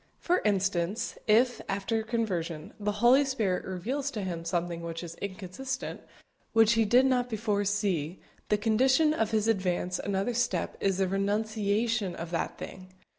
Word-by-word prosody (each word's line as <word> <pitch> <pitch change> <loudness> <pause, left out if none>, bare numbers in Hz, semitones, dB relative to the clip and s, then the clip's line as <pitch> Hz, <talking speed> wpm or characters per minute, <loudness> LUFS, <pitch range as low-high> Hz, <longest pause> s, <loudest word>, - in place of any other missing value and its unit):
For 355 +1 +1
instance, 195 +1 0
if, 240 +3 +4
after 200 +3 -1
conversion, 185 -9 -3
the 210 0 -1
Holy 260 +4 +7
Spirit 220 -10 -1
reveals 245 +10 -2
to 220 -8 -4
him 170 -3 -4
something 170 0 -2
which 165 0 -5
is 170 -1 -7
inconsistent 200 +7 -5 0.5
which 225 0 +5
he 225 -1 +3
did 245 +5 +5
not 250 -2 +2
before 210 -2 0
see 190 -5 -1 0.3
the 210 - +3
condition 260 +8 +3
of 225 -8 0
his 220 -1 +1
advance 185 -4 0
another 200 +4 -1
step 240 +1 0
is 195 -2 +1
the 190 -1 +2
renunciation 210 +1 0
of 165 0 -6
that 170 - -2
thing! 185 0 -8
205 Hz, 155 wpm, -29 LUFS, 185-230 Hz, 0.5 s, Holy